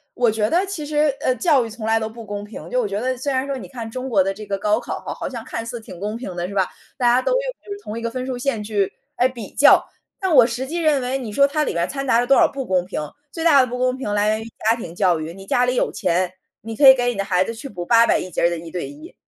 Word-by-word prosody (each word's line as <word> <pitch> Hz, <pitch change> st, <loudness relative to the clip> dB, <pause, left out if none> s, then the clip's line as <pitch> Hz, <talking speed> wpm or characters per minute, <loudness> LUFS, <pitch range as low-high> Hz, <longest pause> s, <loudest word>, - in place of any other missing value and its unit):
我 245 Hz, -2 st, +3 dB
觉 215 Hz, 0 st, 0 dB
得 360 Hz, +4 st, +2 dB
其 375 Hz, -6 st, -5 dB
实， 295 Hz, -1 st, +1 dB
呃， 255 Hz, -, +2 dB
教 275 Hz, +1 st, +3 dB
育 -, -, -6 dB
从 220 Hz, 0 st, -7 dB
来 225 Hz, -, +3 dB
都 220 Hz, 0 st, -3 dB
不 230 Hz, 0 st, -10 dB
公 205 Hz, 0 st, -5 dB
平， 205 Hz, -6 st, -9 dB
就 250 Hz, +4 st, +1 dB
我 -, -, -1 dB
觉 200 Hz, +1 st, -3 dB
得 255 Hz, +2 st, -1 dB
虽 275 Hz, +3 st, -2 dB
然 260 Hz, +1 st, 0 dB
说 275 Hz, -1 st, -2 dB
你 -, -, -8 dB
看 235 Hz, -4 st, -6 dB
中 255 Hz, +3 st, -5 dB
国 200 Hz, -5 st, +4 dB
的 195 Hz, +1 st, -1 dB
这 215 Hz, +2 st, -9 dB
个 200 Hz, -1 st, -2 dB
高 210 Hz, +2 st, +1 dB
考 -, -, -5 dB
哈， -, -, -6 dB
好 -, -, -5 dB
像 240 Hz, -4 st, -6 dB
看 230 Hz, -2 st, -5 dB
似 235 Hz, +1 st, -5 dB
挺 220 Hz, -5 st, -11 dB
公 210 Hz, +3 st, -3 dB
平 215 Hz, -7 st, -7 dB
的， 175 Hz, 0 st, -2 dB
是 200 Hz, -, -8 dB
吧？ 190 Hz, -2 st, +2 dB, 0.3 s
大 250 Hz, -, 0 dB
家 245 Hz, +2 st, +4 dB
都 -, -, -1 dB
用 -, -, +2 dB, 0.2 s
就 405 Hz, -, -10 dB
是 405 Hz, -, -9 dB
同 215 Hz, -, -6 dB
一 -, -, -8 dB
个 230 Hz, 0 st, -3 dB
分 255 Hz, +1 st, -4 dB
数 255 Hz, -1 st, -3 dB
线 245 Hz, -3 st, -1 dB
去 205 Hz, -2 st, 0 dB, 0.3 s
诶， 250 Hz, +1 st, +3 dB
比 235 Hz, -6 st, -9 dB
较， 285 Hz, -, +6 dB, 0.3 s
但 380 Hz, -4 st, 0 dB
我 250 Hz, -3 st, +8 dB
实 245 Hz, +2 st, -4 dB
际 335 Hz, +4 st, -3 dB
认 300 Hz, -4 st, +3 dB
为 255 Hz, +2 st, -1 dB
你 240 Hz, -5 st, -6 dB
说 280 Hz, +6 st, +4 dB
它 300 Hz, +2 st, 0 dB
里 -, -, -1 dB
边 170 Hz, 0 st, 0 dB
掺 275 Hz, 0 st, -4 dB
杂 235 Hz, -3 st, +3 dB
了 245 Hz, -, 0 dB
多 275 Hz, -, +6 dB
少 -, -, +5 dB
不 270 Hz, -2 st, -4 dB
公 185 Hz, -1 st, +1 dB
平， 185 Hz, -, -4 dB, 0.3 s
最 330 Hz, -, -5 dB
大 290 Hz, -5 st, +7 dB
的 255 Hz, -, +1 dB
不 250 Hz, +1 st, -4 dB
公 255 Hz, 0 st, +1 dB
平 210 Hz, -6 st, -3 dB
来 205 Hz, 0 st, +2 dB
源 215 Hz, +1 st, 0 dB
于 -, -, -9 dB, 0.2 s
家 225 Hz, -, +4 dB
庭 170 Hz, -8 st, -7 dB
教 180 Hz, -3 st, +3 dB
育， 160 Hz, +2 st, -6 dB
你 195 Hz, +1 st, -11 dB
家 245 Hz, +5 st, +2 dB
里 250 Hz, -, 0 dB
有 -, -, +1 dB
钱， 180 Hz, -1 st, 0 dB, 0.3 s
你 225 Hz, 0 st, -6 dB
可 275 Hz, +3 st, +8 dB
以 265 Hz, -, +11 dB
给 245 Hz, -2 st, -1 dB
你 240 Hz, -, -2 dB
的 200 Hz, -, -1 dB
孩 185 Hz, -2 st, +1 dB
子 230 Hz, -, -4 dB
去 255 Hz, +5 st, -8 dB
补 175 Hz, -3 st, -6 dB
800 230 Hz, +3 st, +5 dB
1 185 Hz, -, -6 dB
节 -, -, -3 dB
儿 170 Hz, -, +5 dB
的 170 Hz, -, -3 dB
一 165 Hz, 0 st, -9 dB
对 175 Hz, +1 st, -4 dB
一。 305 Hz, +4 st, -12 dB
235 Hz, 340 characters per minute, -21 LUFS, 205-265 Hz, 0.3 s, 以